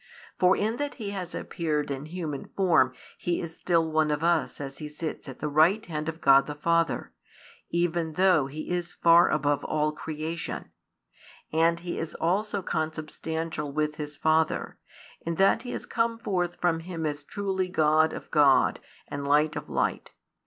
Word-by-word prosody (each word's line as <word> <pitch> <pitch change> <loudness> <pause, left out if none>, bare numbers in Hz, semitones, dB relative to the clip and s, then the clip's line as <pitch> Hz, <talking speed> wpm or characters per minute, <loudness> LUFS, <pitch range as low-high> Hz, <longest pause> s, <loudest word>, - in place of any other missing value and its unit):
For 185 +1 +5
in 220 +3 0
that 290 0 -3
He 210 -5 -5
has 185 -4 -5
appeared 150 -5 -2
in 140 +2 -4
human 160 -4 -5
form 165 -9 +4 0.3
He 175 -1 -1
is 165 -1 -6
still 165 -3 +1
one 155 -1 +2
of 150 +1 -1
us 170 0 +1
as 140 -1 -6
He 150 -1 -6
sits 150 -1 -5
at 130 - -8
the 150 - -3
right 165 +9 +3
hand 155 -1 -3
of 160 0 -6
God 135 0 +6
the 150 - -5
Father, 165 +2 0 0.6
even 170 -2 0
though 180 -5 +4
He 155 +5 -6
is 175 -1 -2
far 170 +1 +6
above 145 -1 +1
all 150 0 0
creation; 160 +2 -5 0.8
and 165 +1 +3
He 175 0 -4
is 165 - -5
also 200 +3 0
Consubstantial 155 -1 -3
with 150 +1 -1
His 150 -1 -6
Father, 160 0 +1 0.4
in 170 0 -2
that 195 +3 +4
He 245 - -8
has - - -5
come 230 -1 0
forth 180 -5 -1
from 170 -2 +1
Him 165 -1 -5
as 145 -1 -2
truly 190 +2 -2
God 155 -2 +3
of - - -8
God 145 -3 +4 0.3
and 140 0 -5
Light 150 +2 +3
of - - -6
Light. - - -1
160 Hz, 175 wpm, -27 LUFS, 150-175 Hz, 0.8 s, God